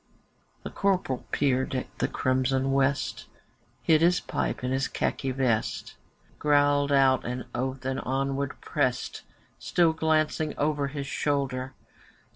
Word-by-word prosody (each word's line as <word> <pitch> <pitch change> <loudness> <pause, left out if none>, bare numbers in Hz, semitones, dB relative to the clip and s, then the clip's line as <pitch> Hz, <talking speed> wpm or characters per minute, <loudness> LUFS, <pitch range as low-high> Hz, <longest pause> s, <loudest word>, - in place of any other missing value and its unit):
The - - -6
Corporal 185 -10 0
peered 130 -2 +1
at 130 - -5
the - - +2
crimson 130 +1 +1
West, 140 +1 0 0.6
Hid 160 -1 +4
his 175 +2 +4
pipe - - -3
in 125 - -1
his 135 0 +1
khaki 135 - -2
vest. 125 -4 -1 0.4
Growled 145 -1 +3
out 135 -2 +4
an 125 +1 -4
oath 130 +1 -3
and 130 0 -1
onward 135 +1 -2
pressed, - - -1 0.4
Still 170 -2 +2
glancing 155 -1 0
over 145 -1 0
his 140 0 -5
shoulder. 135 -2 -1
135 Hz, 125 wpm, -27 LUFS, 130-145 Hz, 0.6 s, Hid